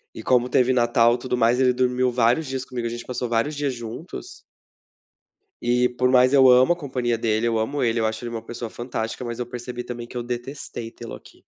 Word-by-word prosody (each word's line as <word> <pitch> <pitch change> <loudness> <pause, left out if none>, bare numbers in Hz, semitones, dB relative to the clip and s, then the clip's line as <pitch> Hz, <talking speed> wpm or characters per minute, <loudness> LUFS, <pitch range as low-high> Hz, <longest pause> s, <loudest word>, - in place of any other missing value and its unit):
E 110 - -8
como 125 +1 +3
teve 125 0 +3
Natal 120 -1 +4
e - - -4
tudo 125 0 -2
mais, 120 +1 +3
ele 130 -1 +4
dormiu 125 0 +1
vários 125 +5 +2
dias 130 -1 -3
comigo. 120 -2 -4
A - - -2
gente 120 0 -6
passou 125 0 -3
vários 120 +6 0
dias 145 -2 -2
juntos 120 - -8 1.2
e 125 +1 +2
por 125 +1 +2
mais 130 +1 +5
eu 135 -2 +7
amo 125 +6 +6
a - - -7
companhia 130 -7 -2
dele. 110 0 0
Eu 115 -1 +1
amo 135 +6 -2
ele. 115 -1 +1
Eu 110 - +1
acho 110 +1 -3
ele 120 - -4
uma 115 -1 -4
pessoa 115 0 -7
fantástica, 120 0 -5
mas 120 0 -5
eu 125 - -2
percebi 120 0 -6
também 120 -1 -7
que 125 - -8
eu 120 - -3
detestei 120 -1 -6
tê-lo 115 0 -9
aqui. - - -17
120 Hz, 230 wpm, -23 LUFS, 120-130 Hz, 1.2 s, eu